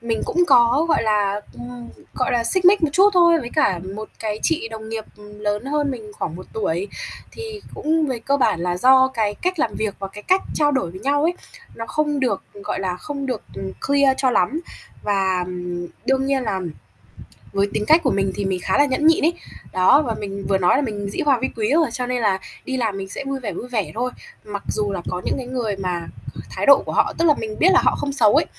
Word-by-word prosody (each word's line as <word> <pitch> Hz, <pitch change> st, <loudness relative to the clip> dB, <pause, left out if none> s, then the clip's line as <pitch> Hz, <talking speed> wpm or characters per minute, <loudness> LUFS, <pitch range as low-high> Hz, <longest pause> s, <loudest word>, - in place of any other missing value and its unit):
mình 230 Hz, -1 st, -1 dB
cũng 355 Hz, 0 st, +2 dB
có, 255 Hz, +3 st, +5 dB
gọi 315 Hz, -, +3 dB
là, 205 Hz, -2 st, +1 dB
ừm, 245 Hz, -1 st, -9 dB, 0.3 s
gọi 255 Hz, -, 0 dB
là, 235 Hz, -1 st, +1 dB
xích 370 Hz, +8 st, 0 dB
mích 375 Hz, -1 st, +6 dB
một 315 Hz, -, +4 dB
chút 385 Hz, +5 st, +6 dB
thôi 340 Hz, -2 st, +5 dB
với 240 Hz, -, -6 dB
cả 195 Hz, -, +2 dB, 0.2 s
một 215 Hz, 0 st, -6 dB
cái 215 Hz, -1 st, -3 dB
chị 315 Hz, -8 st, 0 dB
đồng 220 Hz, -1 st, -8 dB
nghiệp 225 Hz, -1 st, -4 dB
lớn 210 Hz, +1 st, -4 dB
hơn 290 Hz, 0 st, 0 dB
mình 220 Hz, -5 st, -7 dB
khoảng 165 Hz, 0 st, -3 dB
1 185 Hz, -, -10 dB
tuổi. 195 Hz, -2 st, -1 dB, 0.4 s
Thì 445 Hz, -2 st, -7 dB
cũng 315 Hz, 0 st, +1 dB
về 255 Hz, -4 st, -2 dB
cơ 275 Hz, +5 st, 0 dB
bản 210 Hz, -10 st, +2 dB
là 175 Hz, 0 st, -1 dB
do 260 Hz, +6 st, +6 dB
cái 220 Hz, -5 st, -1 dB
cách 365 Hz, -, -2 dB
làm 225 Hz, -7 st, 0 dB
việc 215 Hz, -2 st, -2 dB
và 195 Hz, -, -5 dB
cái 205 Hz, +2 st, -11 dB
cách 375 Hz, -, +3 dB
trao 295 Hz, -1 st, +2 dB
đổi 260 Hz, -11 st, 0 dB
với 185 Hz, +2 st, -10 dB
nhau 285 Hz, +2 st, +1 dB
ấy 335 Hz, +3 st, +3 dB, 0.4 s
nó 230 Hz, 0 st, -6 dB
không 295 Hz, -2 st, 0 dB
được, 240 Hz, -7 st, 0 dB, 0.2 s
gọi -, -, -2 dB
là, 185 Hz, -2 st, -2 dB
không 280 Hz, +5 st, -5 dB
được, 250 Hz, -5 st, -3 dB
ừm, 190 Hz, 0 st, -5 dB
clear 280 Hz, -1 st, +4 dB
cho 260 Hz, -2 st, +2 dB
lắm. 250 Hz, -, +1 dB, 0.4 s
Và, 190 Hz, -3 st, +1 dB
ừm, 180 Hz, -1 st, -5 dB, 0.2 s
đương 265 Hz, 0 st, +2 dB
nhiên 275 Hz, -1 st, +1 dB
là 205 Hz, -5 st, -1 dB, 0.9 s
với 200 Hz, 0 st, +2 dB
tính -, -, 0 dB
cách 325 Hz, +2 st, +6 dB
của 265 Hz, -, +2 dB
mình 195 Hz, -1 st, +1 dB
thì 200 Hz, -, -2 dB
mình 190 Hz, -1 st, -1 dB
khá 190 Hz, -, +1 dB
là 285 Hz, -, +6 dB
nhẫn 290 Hz, +3 st, +1 dB
nhịn 320 Hz, -2 st, +4 dB
ấy. 335 Hz, -, +3 dB, 0.4 s
Đó, 185 Hz, +11 st, +5 dB
và 240 Hz, -7 st, -2 dB
mình 200 Hz, -1 st, -5 dB
vừa 195 Hz, -, +3 dB
nói 180 Hz, -1 st, +3 dB
là 280 Hz, -, +2 dB
mình 205 Hz, -5 st, -3 dB
dĩ -, -, -5 dB
hòa 275 Hz, -4 st, +4 dB
vi 260 Hz, -, +1 dB
quý 215 Hz, 0 st, 0 dB
rồi, 320 Hz, -1 st, +4 dB
cho 250 Hz, +1 st, -3 dB
nên 250 Hz, 0 st, -1 dB
là 200 Hz, -3 st, +2 dB, 0.3 s
đi 260 Hz, -1 st, -2 dB
làm 220 Hz, -5 st, -1 dB
mình 195 Hz, 0 st, -5 dB
sẽ -, -, -5 dB
vui 275 Hz, 0 st, -3 dB
vẻ, 235 Hz, -5 st, -4 dB
vui 245 Hz, -, -6 dB
vẻ 225 Hz, -6 st, -2 dB
thôi. 250 Hz, +2 st, -1 dB, 0.3 s
Mặc 205 Hz, -1 st, -5 dB
dù 210 Hz, -1 st, -1 dB
là 185 Hz, -3 st, -3 dB
có 180 Hz, 0 st, -3 dB
những -, -, 0 dB
cái 255 Hz, -, -5 dB
người 240 Hz, -5 st, -2 dB
mà 180 Hz, -3 st, -3 dB, 0.4 s
thái -, -, -3 dB
độ -, -, +7 dB
của -, -, -4 dB
họ -, -, +2 dB
tức 335 Hz, -, +2 dB
là 300 Hz, -, +6 dB
mình 215 Hz, -1 st, -5 dB
biết 345 Hz, -, +5 dB
là -, -, +6 dB
họ -, -, +3 dB
không 285 Hz, -, -2 dB
xấu 230 Hz, -3 st, +4 dB
ấy, 305 Hz, -, +4 dB
235 Hz, 250 wpm, -21 LUFS, 200-280 Hz, 0.9 s, độ